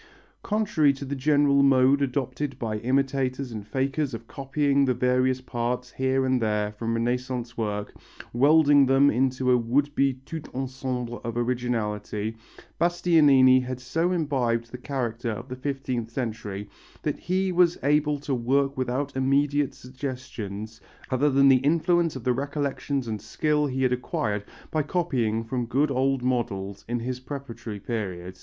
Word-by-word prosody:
Contrary 210 -9 +2
to 140 0 -6
the 140 +1 -3
general 145 0 +3
mode 135 0 +4
adopted 135 0 -2
by 110 -4 -2
imitators 130 +1 0
and 105 -2 -7
fakers 135 +1 -1
of 115 0 -10
copying 140 +1 +1
the 130 -2 +2
various 125 +1 +1
parts 125 0 -3
here 130 0 0
and 130 -1 +1
there 105 -1 0
from 115 +2 -3
Renaissance 120 0 -2
work, 105 -2 -3 0.4
welding 145 +2 +5
them 135 +2 +5
into 130 +1 +1
a 125 - +5
would 135 +5 +1
be 135 -2 +2
tout 160 0 -7
ensemble 130 -2 -4
of 115 0 -4
originality, 115 -3 -2 0.4
Bastianini 150 -7 +5
had 125 0 -5
so 165 +8 0
imbibed 125 -9 0
the 125 - -7
character 120 -4 -3
of 110 +4 -5
the 130 - -4
fifteenth 130 -3 -3
century 110 -5 -4 0.4
that 150 - -2
he 185 +1 0
was 175 -1 +3
able 150 +1 +2
to 145 -1 -2
work 135 +3 +1
without 130 +2 -2
immediate 140 +2 +1
suggestions 120 -5 -7 0.3
other 135 +3 +3
than 140 0 +5
the 135 -1 +7
influence 165 +4 +2
of 130 - -6
the 125 - +2
recollections 140 -1 -2
and 110 -2 -4
skill 150 -1 0
he 130 -1 -2
had 125 -1 +3
acquired 105 -4 -2 0.3
by 155 - +1
copying 130 -9 0
from 120 +1 -3
good 140 +4 +1
old 135 0 +1
models 100 -6 -2
in 120 0 -2
his 125 +1 -3
preparatory 120 -6 -7
period. 95 -5 -5
130 Hz, 150 wpm, -26 LUFS, 120-140 Hz, 0.4 s, the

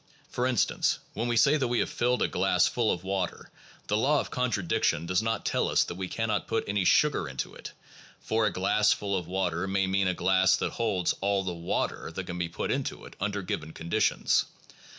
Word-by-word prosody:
For 125 0 0
in 130 -2 0
stance, - - +2 0.2
when 115 +3 -2
we 120 -1 +1
say 140 +6 +5
that 135 -4 0
we 120 0 0
have - - +1
filled 125 +1 0
a - - +2
glass 90 -1 +2
full 115 -3 +1
of 90 - -3
water, 95 -2 -3 0.3
the 105 - 0
law 140 +7 +3
of - - -4
contradiction 105 - 0
does 90 +3 +1
not 115 -1 -2
tell - - +1
us - - +3
that - - -6
we 95 +1 -4
cannot 110 0 -2
put 115 0 0
any 100 -1 0
sugar 145 - +3
into 65 -1 -5
it; - - -9 0.5
for 110 -1 +1
'a - - 0
glass 105 +3 +2
full 100 -1 -3
of 90 -3 -3
water' 90 -1 -1
may 95 0 +1
mean 95 0 +1
a 90 - 0
glass 95 +1 +3
that - - -2
holds 105 -7 0
all 100 0 +1
the 90 -2 -3
water 85 -1 -2
that 95 - -4
can 90 0 -5
be 85 -1 -1
put 85 - -3
into - - -3
it - - -12
under 100 0 -2
given 80 -3 -4
conditions. 85 +6 +1
100 Hz, 220 wpm, -28 LUFS, 90-115 Hz, 0.5 s, say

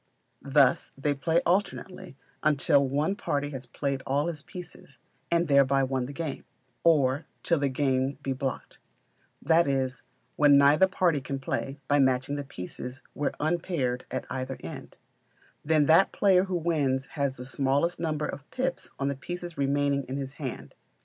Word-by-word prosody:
Thus 140 -1 +3
they 145 +1 0
play 160 +4 +1
alternately, 185 -2 -1 0.2
either - - -37 0.2
until 140 0 +3
one 150 +8 0
party 145 -6 -2
has 130 -3 -7
played 135 +2 -2
all 140 +2 +1
his 165 -3 -4
pieces, 175 -5 -11 0.3
and 170 0 +2
thereby 140 -1 +4
won 130 -1 -1
the - - -7
game, 150 0 -5 0.4
or 145 -3 +3 0.2
till 170 -3 +2
the 140 -1 +1
game 135 0 0
be 135 - -1
blocked; 135 0 -5 0.6
that 165 +2 +4
is, 135 -1 -1 0.4
when 145 -1 +6
neither 145 +6 +6
party 175 -6 +1
can 135 +1 -4
play, 135 +1 -3
by 145 0 +3
matching 130 +1 +2
the 145 - -3
pieces 125 +2 -8
where 145 - -1
unpaired 155 -6 -1
at - - -4
either 130 0 -3
end; 80 - -9 0.7
then 155 -1 +3
that 165 +6 +5
player 190 -2 +4
wins 160 -7 0
who - - -24
has 135 -1 0
the 125 - -7
smallest 140 +5 0
number 155 -2 -1
of 140 0 -7
pips 260 +1 -3
on 135 - -1
the 140 - -1
pieces 175 +4 -6
remaining 140 0 +1
in 130 +2 -4
his 135 -1 -5
hand. 70 - -6
140 Hz, 165 wpm, -28 LUFS, 135-160 Hz, 0.7 s, when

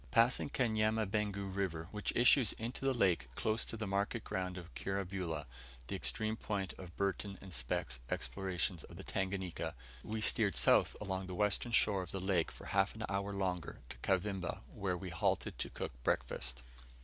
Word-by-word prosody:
Passing 115 - +4
Kanyamabengu 110 -4 +1
River, 85 -5 -1
which 105 -1 -1
issues 120 -1 +6
into 120 +4 -4
the 135 - +4
lake 90 - +3
close 110 0 +1
to 115 - -5
the 110 - -2
market 100 +3 0
ground 95 -2 -2
of 90 -1 -9
Kirabula, 95 -5 -2 0.4
the - - -1
extreme 110 0 0
point 100 -4 -2
of 90 -2 -9
Burton 100 0 -1
and 95 -2 -10
Speke's - - -2
explorations 85 +4 -1
of - - -12
the - - -7
Tanganika, 95 -2 -2 0.3
we 110 - -3
steered 105 - +3
south - - +5
along 95 -2 -2
the 90 - -5
western 105 +4 +2
shore 105 -3 +4
of 90 - -6
the 95 - -2
lake 90 -3 +2
for - - -11
half 95 +1 +2
an 110 - -4
hour 100 0 0
longer 95 -4 -2
to - - -8
Kavimba, 95 -1 0
where 95 -3 -1
we 90 0 -6
halted 80 - 0
to - - -2
cook - - -4
breakfast. - - -1
95 Hz, 175 wpm, -36 LUFS, 90-105 Hz, 0.4 s, issues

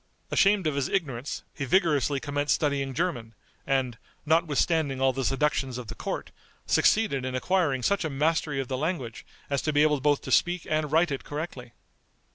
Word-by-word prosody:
Ashamed 195 -2 +3
of 155 - +1
his 140 -1 -1
ignorance, 140 -8 -2
he 140 - -5
vigorously 150 -3 +2
commenced 145 +1 0
studying 140 -3 -1
German, 125 -10 -2 0.3
and, 130 -4 0 0.3
notwithstanding 160 -2 +1
all 135 0 +3
the 135 +1 -2
seductions 135 -1 0
of 120 -3 -7
the - - -4
court, - - -5 0.3
succeeded 210 - +2
in 130 0 -3
acquiring 140 -3 +1
such 200 +4 +1
a 160 - -1
mastery 150 0 0
of 135 - -3
the 130 0 -3
language 135 -8 -3 0.2
as 140 -2 -1
to 155 - -1
be 145 0 +4
able 150 -3 +2
both 145 0 +2
to - - -7
speak 175 0 +2
and 155 -1 -1
write 165 +1 +3
it 135 - -3
correctly. 145 -6 -6
145 Hz, 180 wpm, -27 LUFS, 135-160 Hz, 0.3 s, be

